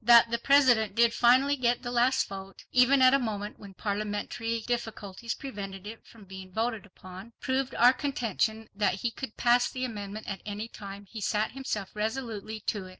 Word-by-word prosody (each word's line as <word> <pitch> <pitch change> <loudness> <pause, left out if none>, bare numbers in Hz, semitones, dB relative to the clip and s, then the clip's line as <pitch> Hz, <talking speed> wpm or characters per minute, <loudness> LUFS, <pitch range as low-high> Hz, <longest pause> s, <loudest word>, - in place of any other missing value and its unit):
That 235 0 +7
the 235 - 0
President 245 -7 +4
did 235 0 +4
finally 260 +4 +4
get 245 -2 0
the 240 - -4
last 245 +2 +2
vote 195 0 -9
even 260 +2 +5
at 255 +1 +7
a 275 - +5
moment 210 -4 -4
when 200 -2 -12
parliamentary 210 +3 -3
difficulties 225 -2 -4
prevented 200 -8 -7
it 225 +2 -9
from 220 -3 -15
being 190 0 -10
voted 225 0 -2
upon, 185 +4 -12
proved 260 0 -1
our 245 +2 +6
contention 230 -5 -1
that 205 -2 +1
he 235 - +1
could 230 -1 -7
pass 245 0 +3
the 255 -1 -3
amendment 210 -2 -6
at 195 - -5
any 210 +2 -5
time 200 -2 -9
he 215 +2 -9
set 210 +2 0
himself 220 -7 -4
resolutely 220 -1 -3
to 200 -2 -3
it. - - -11
225 Hz, 185 wpm, -29 LUFS, 205-245 Hz, -, That